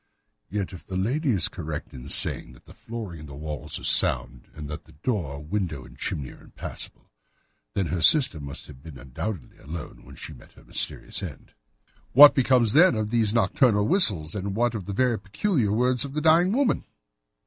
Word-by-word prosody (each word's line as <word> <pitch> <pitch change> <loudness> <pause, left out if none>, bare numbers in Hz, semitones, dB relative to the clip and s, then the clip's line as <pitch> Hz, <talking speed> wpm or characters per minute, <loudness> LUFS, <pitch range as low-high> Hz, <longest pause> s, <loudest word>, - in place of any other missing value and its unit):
"Yet 100 -1 -4
if 90 - -10
the 95 - -6
lady 135 - -1
is 95 -9 +3
correct 80 -4 -7
in 65 +1 -10
saying - - +3
that - - -20
the - - -15
flooring 110 -8 -8
and 75 -1 -11
walls 75 +2 -6
are - - -11
sound, - - +2
and 75 -1 -8
that 75 +1 -8
the 80 - -19
door, 75 - -3
window, 80 -6 -4
and - - -15
chimney 70 -3 -4
are - - -16
impassable, - - -8 0.6
then 100 - 0
her 85 +2 -3
sister 130 - +4
must 70 -1 -8
have 65 - -14
been 80 -3 -11
undoubtedly 70 - -7
alone 75 -5 -9
when 70 +3 -14
she - - -9
met - - -17
her - - -19
mysterious - - -2
end." - - -9 0.6
"What 145 +3 +10
becomes, 125 -4 +2
then, 165 -2 +5
of 110 -1 -3
these 115 -3 +1
nocturnal 110 0 +2
whistles, 100 - +4
and 100 -1 -4
what 120 +1 +1
of 105 -5 -6
the 100 - -5
very 125 +1 +1
peculiar 120 - -1
words 125 +2 +2
of 140 0 -6
the 150 - -1
dying 165 +4 +4
woman?" 260 +2 +1
100 Hz, 190 wpm, -25 LUFS, 75-125 Hz, 0.6 s, What